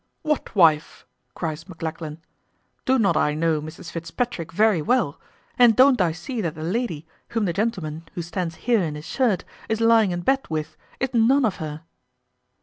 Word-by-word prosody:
"What 300 Hz, -6 st, -1 dB
wife?" 160 Hz, -5 st, +3 dB, 0.3 s
cries 160 Hz, +1 st, -4 dB
Maclachlan; 160 Hz, -2 st, -6 dB, 0.6 s
"do 260 Hz, 0 st, +3 dB
not 210 Hz, -5 st, +3 dB
I 150 Hz, -, +2 dB
know 160 Hz, -1 st, +1 dB
Mrs 155 Hz, +2 st, -9 dB
Fitzpatrick 165 Hz, +2 st, -3 dB
very 210 Hz, -2 st, +3 dB
well, 225 Hz, -, 0 dB, 0.4 s
and 240 Hz, -3 st, +7 dB
don't 260 Hz, -2 st, +6 dB
I 175 Hz, -3 st, +3 dB
see 225 Hz, -, -5 dB
that 165 Hz, -5 st, -2 dB
the 155 Hz, -, -6 dB
lady, 175 Hz, -4 st, -2 dB, 0.2 s
whom 225 Hz, -2 st, -1 dB
the 175 Hz, -, 0 dB
gentleman 170 Hz, -7 st, -3 dB
who 175 Hz, -, -3 dB
stands 170 Hz, -1 st, -3 dB
here 235 Hz, -4 st, +4 dB
in 155 Hz, -4 st, -2 dB
his 150 Hz, +1 st, -8 dB
shirt 235 Hz, -6 st, 0 dB, 0.2 s
is 220 Hz, 0 st, 0 dB
lying 225 Hz, -2 st, +5 dB
in 175 Hz, -1 st, -2 dB
bed 270 Hz, +7 st, +1 dB
with, 155 Hz, 0 st, -3 dB, 0.2 s
is 265 Hz, 0 st, -2 dB
none 250 Hz, +4 st, +4 dB
of 210 Hz, -, -1 dB
her?" 155 Hz, 0 st, -6 dB
175 Hz, 175 wpm, -23 LUFS, 160-230 Hz, 0.6 s, and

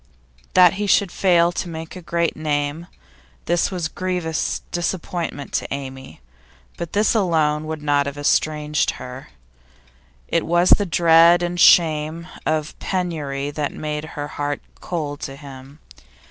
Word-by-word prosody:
That 180 Hz, -2 st, +7 dB
he 205 Hz, -, 0 dB
should 195 Hz, -2 st, +3 dB
fail 175 Hz, -2 st, +3 dB
to 175 Hz, +1 st, -4 dB
make 160 Hz, +1 st, -7 dB
a 185 Hz, -, -8 dB
great 170 Hz, 0 st, -1 dB
name, 150 Hz, +1 st, -2 dB, 0.6 s
this 175 Hz, 0 st, +1 dB
was 180 Hz, -4 st, -2 dB
grievous 180 Hz, -2 st, -2 dB
disappointment 170 Hz, -4 st, -3 dB
to -, -, -2 dB
Amy, 135 Hz, -, -7 dB, 0.5 s
but 170 Hz, -, -6 dB
this 210 Hz, +1 st, +3 dB
alone 160 Hz, -7 st, +1 dB
would 155 Hz, -1 st, -5 dB
not 145 Hz, -1 st, +2 dB
have 140 Hz, 0 st, -5 dB
estranged 150 Hz, +1 st, +1 dB
her. 125 Hz, +1 st, -9 dB, 1.0 s
It -, -, +1 dB
was 175 Hz, +2 st, +2 dB
the 205 Hz, -, +5 dB
dread 170 Hz, +1 st, +5 dB
and 175 Hz, 0 st, -2 dB
shame 160 Hz, -1 st, +4 dB, 0.2 s
of 155 Hz, -1 st, -2 dB
penury 150 Hz, -7 st, -3 dB
that 145 Hz, -1 st, -3 dB
made 150 Hz, 0 st, -4 dB
her 145 Hz, 0 st, -3 dB
heart 145 Hz, 0 st, -3 dB, 0.2 s
cold 150 Hz, -5 st, -4 dB
to 135 Hz, -, -6 dB
him. 135 Hz, 0 st, -12 dB
160 Hz, 140 wpm, -21 LUFS, 145-175 Hz, 1.0 s, That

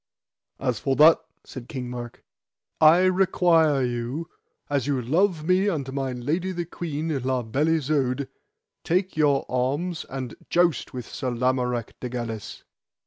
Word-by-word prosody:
As 125 Hz, -4 st, -1 dB
for 135 Hz, -1 st, 0 dB
that, 155 Hz, +3 st, +7 dB, 0.2 s
said 125 Hz, -3 st, -10 dB
King 130 Hz, -3 st, -5 dB
Mark, 120 Hz, -1 st, -7 dB, 0.6 s
I 160 Hz, +3 st, +7 dB
require 175 Hz, -6 st, +3 dB
you, 120 Hz, +6 st, -4 dB, 0.4 s
as 140 Hz, -3 st, -1 dB
ye 145 Hz, -, +1 dB
love 160 Hz, -, +1 dB
me 185 Hz, +3 st, +3 dB
and 140 Hz, -9 st, -2 dB
my 135 Hz, -1 st, -2 dB
lady 150 Hz, +10 st, -2 dB
the 175 Hz, -2 st, -3 dB
queen, 160 Hz, -2 st, -3 dB
La 130 Hz, 0 st, 0 dB
Beale 135 Hz, +8 st, 0 dB
Isoud, 140 Hz, -3 st, 0 dB, 0.6 s
take 185 Hz, +3 st, 0 dB
your 145 Hz, -3 st, +2 dB
arms 145 Hz, +7 st, -1 dB
and 130 Hz, -3 st, -5 dB, 0.2 s
joust 175 Hz, -5 st, +2 dB
with 125 Hz, -2 st, -6 dB
Sir 130 Hz, -, -4 dB
Lamorak 125 Hz, -1 st, -1 dB
de 125 Hz, -, -5 dB
Galis. 115 Hz, -4 st, -5 dB
140 Hz, 140 wpm, -25 LUFS, 125-165 Hz, 0.6 s, that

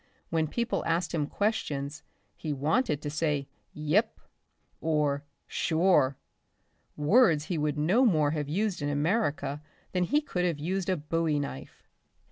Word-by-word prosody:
When 160 Hz, -1 st, +1 dB
people 235 Hz, +8 st, -1 dB
asked 165 Hz, +2 st, 0 dB
him 150 Hz, -3 st, 0 dB
questions 155 Hz, -8 st, -2 dB, 0.3 s
he 155 Hz, -2 st, -3 dB
wanted 150 Hz, -, 0 dB
to 145 Hz, -, -2 dB
say 150 Hz, -3 st, 0 dB, 0.3 s
"Yep" 160 Hz, +9 st, +1 dB, 0.6 s
or 150 Hz, -3 st, +1 dB, 0.2 s
"Sure," 160 Hz, -5 st, +2 dB, 0.8 s
words 160 Hz, -, +4 dB
he 175 Hz, -, -2 dB
would 150 Hz, 0 st, 0 dB
no 180 Hz, -, +3 dB
more 155 Hz, -, +3 dB
have 150 Hz, -2 st, -2 dB
used 190 Hz, +1 st, -1 dB
in 145 Hz, -, -1 dB
America 150 Hz, -1 st, 0 dB, 0.3 s
than 180 Hz, -1 st, +1 dB
he 295 Hz, +10 st, +3 dB
could 185 Hz, -12 st, -2 dB
have 170 Hz, -4 st, +1 dB
used 185 Hz, +5 st, -2 dB
a 185 Hz, -, +2 dB
bowie 155 Hz, 0 st, 0 dB
knife. 140 Hz, -, -6 dB
160 Hz, 140 wpm, -29 LUFS, 145-185 Hz, 0.8 s, words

